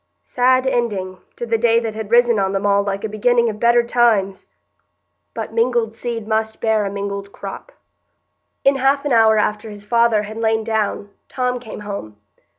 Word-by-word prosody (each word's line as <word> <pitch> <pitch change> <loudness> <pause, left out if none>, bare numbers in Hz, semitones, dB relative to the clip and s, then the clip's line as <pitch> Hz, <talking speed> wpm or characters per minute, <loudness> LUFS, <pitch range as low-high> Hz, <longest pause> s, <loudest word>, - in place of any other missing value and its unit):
Sad 255 +1 +2
ending 205 -8 -2 0.2
to 240 - -5
the 225 -1 0
day 230 0 +3
that 225 -2 -4
had 220 -1 -6
risen 235 -1 +4
on 195 0 0
them 195 +1 -2
all 200 0 +3
like 200 -1 -3
a - - -1
beginning 235 +2 +1
of 210 - -11
better 235 +1 +4
times! 225 -5 +1 0.9
But - - -5
mingled 230 -1 +1
seed 230 -2 -5
must 220 0 -1
bear 220 -2 +1
a - - -2
mingled 200 0 -5
crop. - - -9 0.9
In 275 0 +4
half 275 +2 +1
an 290 - -1
hour 220 -2 +5
after 210 +1 -1
his 205 -1 -11
father 230 -1 +2
had 215 +1 -8
lain 220 -1 0
down 215 -2 -2 0.2
Tom 250 -1 -2
came 220 -3 -9
home. 200 - -7
220 Hz, 180 wpm, -19 LUFS, 205-240 Hz, 0.9 s, hour